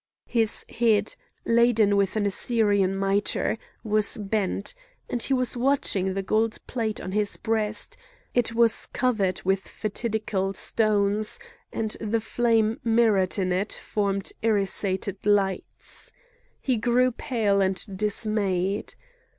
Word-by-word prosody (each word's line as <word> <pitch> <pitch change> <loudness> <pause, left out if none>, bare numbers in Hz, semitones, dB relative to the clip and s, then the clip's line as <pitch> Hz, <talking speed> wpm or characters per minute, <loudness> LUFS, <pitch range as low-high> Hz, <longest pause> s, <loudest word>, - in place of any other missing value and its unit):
His 225 -3 0
head, 220 -3 +1 0.3
laden 230 -3 +3
with 200 0 +1
an 210 -1 0
Assyrian 200 -2 +1
mitre, 195 +3 0 0.2
was 215 -1 +3
bent, 205 - -2 0.3
and 240 - -2
he - - +2
was 255 -2 +2
watching 240 -7 +1
the 195 - -2
gold 220 +3 0
plate 225 -4 -2
on 185 - -6
his 210 +1 0
breast; 220 -1 -2 0.4
it 235 -2 +1
was 230 -1 +3
covered 210 -8 0
with 195 +1 +2
fatidical 210 -2 -3
stones, 210 - +1 0.3
and 220 -1 -2
the 225 +1 0
flame 225 0 +1
mirrored 225 -5 +2
in 185 -2 0
it 190 +4 0
formed 200 -2 -2
irisated 200 -2 0
lights. 200 -2 -1 0.5
He 255 -3 0
grew 245 +3 +2
pale 220 -5 0
and 190 0 +1
dismayed. 205 -2 0
215 Hz, 120 wpm, -25 LUFS, 195-230 Hz, 0.5 s, laden